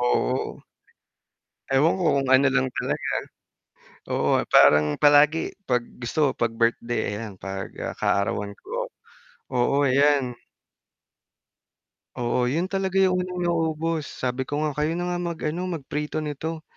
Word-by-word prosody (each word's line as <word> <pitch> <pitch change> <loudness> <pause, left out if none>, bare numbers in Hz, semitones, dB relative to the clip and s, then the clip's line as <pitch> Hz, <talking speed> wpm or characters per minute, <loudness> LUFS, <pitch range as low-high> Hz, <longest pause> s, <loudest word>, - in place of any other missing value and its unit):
oo. 125 +1 0 1.1
Ewan 145 +7 +4
ko 190 - -3 0.2
kung 135 - -3
ano 130 +1 +5
lang 130 -1 +2
talaga, - - -2 1.0
oo, - - +1 0.2
parang 75 0 +5
palagi 150 +2 +4 0.2
'pag 125 -1 +3 0.2
gusto 140 +3 +1
'pag 120 - 0
birthday, 115 -1 -1
ayan, 105 -3 -7
'pag, 95 +1 -6
ah, - - -4
kaarawan 100 +1 0
ko, - - -5 0.6
oo 140 +3 +2
ayan. 140 -1 +3 1.8
Oo, 125 0 0
yun 165 +9 -1
talaga 195 -1 -2
yung 185 -1 +3
unang 180 -1 -3
naubos. 165 -2 -1
Sabi 130 +1 -3
ko 145 +3 -2
nga 155 - +1
kayo 155 +2 +1
na 175 +1 -2
nga 175 - -1
mag-ano 170 0 -3
mag 170 -5 -4
prito 150 +1 -2
nito. 155 +2 -4
145 Hz, 130 wpm, -24 LUFS, 125-165 Hz, 1.8 s, ano